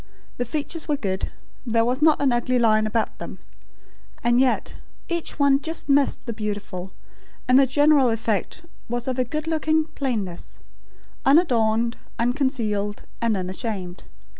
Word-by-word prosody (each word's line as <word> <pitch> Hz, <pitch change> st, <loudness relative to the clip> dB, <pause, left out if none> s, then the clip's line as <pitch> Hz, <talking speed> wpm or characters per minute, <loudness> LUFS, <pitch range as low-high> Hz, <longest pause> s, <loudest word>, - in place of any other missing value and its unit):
The 245 Hz, -, -1 dB
features 305 Hz, +5 st, -4 dB
were 295 Hz, -, +1 dB
good; 190 Hz, -5 st, -2 dB, 0.3 s
there 230 Hz, -2 st, +2 dB
was 250 Hz, +4 st, 0 dB
not 310 Hz, -1 st, +5 dB
an 275 Hz, -2 st, +2 dB
ugly 240 Hz, +1 st, +1 dB
line 215 Hz, -2 st, +3 dB
about 220 Hz, 0 st, -1 dB
them; -, -, -7 dB, 0.9 s
and 240 Hz, +1 st, +3 dB
yet, 260 Hz, -1 st, +1 dB, 0.4 s
each 340 Hz, -2 st, -3 dB
one 280 Hz, -1 st, +4 dB
just 325 Hz, +1 st, -4 dB
missed 280 Hz, -1 st, +2 dB
the 235 Hz, -, -3 dB
beautiful; 205 Hz, -4 st, -5 dB, 0.6 s
and 255 Hz, +1 st, +6 dB
the 275 Hz, -, +5 dB
general 290 Hz, -1 st, +4 dB
effect 225 Hz, -, -2 dB, 0.3 s
was 240 Hz, +1 st, -3 dB
of 260 Hz, 0 st, -1 dB
a -, -, +4 dB
good 305 Hz, +5 st, -4 dB
looking 315 Hz, -1 st, +1 dB
plainness; 210 Hz, -11 st, -3 dB, 0.7 s
unadorned, 235 Hz, -6 st, +3 dB, 0.2 s
unconcealed, 230 Hz, -5 st, -1 dB, 0.2 s
and 230 Hz, -3 st, +1 dB
unashamed. 185 Hz, -1 st, -4 dB
245 Hz, 140 wpm, -24 LUFS, 215-280 Hz, 0.9 s, and